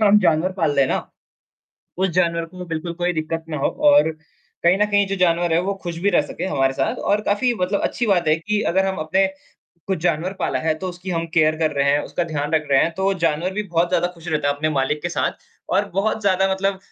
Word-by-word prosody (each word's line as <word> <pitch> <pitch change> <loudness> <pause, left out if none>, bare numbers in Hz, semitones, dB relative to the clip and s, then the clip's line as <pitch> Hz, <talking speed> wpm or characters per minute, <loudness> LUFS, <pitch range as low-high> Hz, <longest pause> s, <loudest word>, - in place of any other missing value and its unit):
हम 210 0 +6
जानवर 170 0 +2
पाल 165 -5 0
रहें 140 - +4
है - - -1
ना। - - 0 1.0
उस 190 - +2
जानवर 170 -1 +1
को 180 0 -7
बिल्कुल 165 +1 -4
कोई 175 0 +1
दिक्कत 160 0 -3
ना 155 - -3
हो - - +3 0.2
और 290 - +5 0.5
कहीं 175 +2 +4
न 210 - +4
कहीं 205 -1 +3
जो 195 - -3
जानवर 175 -2 +2
है 165 - +3
वो 200 +1 -1
खुश 175 -2 -5
भी 200 - +4
रह 175 - +4
सके - - -5
हमारे 135 -7 +1
साथ 135 0 -1
और 205 +1 +3
काफ़ी 240 +4 +2
मतलब 185 +3 0
अच्छी 240 - -2
बात 175 -5 +2
है 155 - +4
कि 210 +6 -1
अगर 190 +2 +2
हम 190 0 -2
अपने 190 +3 +3 0.6
कुछ 190 -3 0
जानवर 170 +2 0
पाला 130 - -1
है 160 +3 0
तो 185 - -4
उसकी 180 +1 -7
हम 165 -1 -1
केयर 155 -1 +3
कर 160 -1 +1
रहे 140 0 +2
हैं, 145 - +3
उसका 175 - -2
ध्यान 150 -3 -3
रख 155 -1 +1
रहे 135 - +5
हैं 170 - 0
तो 190 - -2
वो 195 - +3
जानवर 165 +4 0
भी 210 +2 -2
बहुत 170 +1 +2
ज़्यादा 175 0 +1
खुश 170 0 -14
रहता 150 -3 0
है 140 - +1
अपने 155 +2 -1
मालिक 145 +1 0
के 175 - -1
साथ 175 - -1 0.4
और 200 +2 +3
बहुत 220 +3 0
ज़्यादा 195 -1 +2
मतलब 195 0 -1
175 Hz, 250 wpm, -21 LUFS, 155-190 Hz, 1.0 s, हम